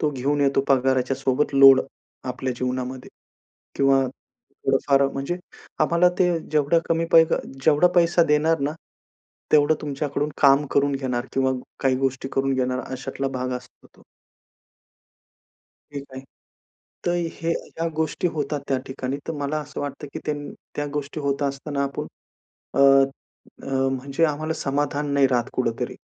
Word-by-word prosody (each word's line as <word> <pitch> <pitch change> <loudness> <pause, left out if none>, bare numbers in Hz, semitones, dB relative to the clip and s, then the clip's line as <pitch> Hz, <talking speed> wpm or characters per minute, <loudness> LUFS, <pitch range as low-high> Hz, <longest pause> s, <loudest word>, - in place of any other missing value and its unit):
तो 150 - +1
घेऊन 145 +2 -1
येतो 140 -1 +3
पगाराच्यासोबत 130 +1 +1
लोड 135 -1 +8 0.4
आपल्या 130 0 -3
जीवनामध्ये 130 0 -3 0.7
किंवा 135 -1 +4
थोडं-फार 135 +1 -1
म्हणजे 140 +5 -3 0.4
आम्हाला 170 +1 +4
ते 180 -1 +4 0.2
जेवढं 150 +2 +3
कमी 165 0 +1
पैक 165 -1 +6 0.3
जेवढा 155 +3 +5
पैसा 170 0 +4
देणार 155 +1 +2
ना, 140 +1 0 0.8
तेवढं 150 +1 +5
तुमच्याकडून 145 0 -2
काम 140 +1 +5
करून 140 0 +2
घेणार 130 -2 -2
किंवा 130 0 +1 0.3
काही 130 -1 +2
गोष्टी 135 0 -2
करून 135 0 +1
घेणार 130 0 0
अशातला 135 +1 -3
भाग 130 -1 -3
असतो 125 0 -15
तो. - - -20 1.9
ठीक 140 -1 -6
आहे. 130 - -7 0.8
तर 175 - +2 0.2
हे 165 0 -3
ह्या 165 0 -3
गोष्टी 160 +2 -1
होतात 150 -1 -2
त्या 135 - +1
ठिकाणी. 130 0 -4
तर - - -1
मला 145 0 -2
असं 150 0 -7
वाटतं, 145 +1 -5
की - - -5
त्यान 145 -1 -4 0.2
त्या 145 - -2
गोष्टी 145 +1 -4
होत 140 0 -1
असताना 140 +1 -2
आपण 140 - -4 0.7
अ, - - -1 0.8
अ, - - -9 0.3
म्हणजे 135 +4 -1
आम्हाला 155 +1 -2
समाधान 145 +1 -1
नाही 140 -1 +5
राहत 125 -1 0
कुठेतरी. 115 -3 -2
140 Hz, 140 wpm, -23 LUFS, 130-150 Hz, 1.9 s, लोड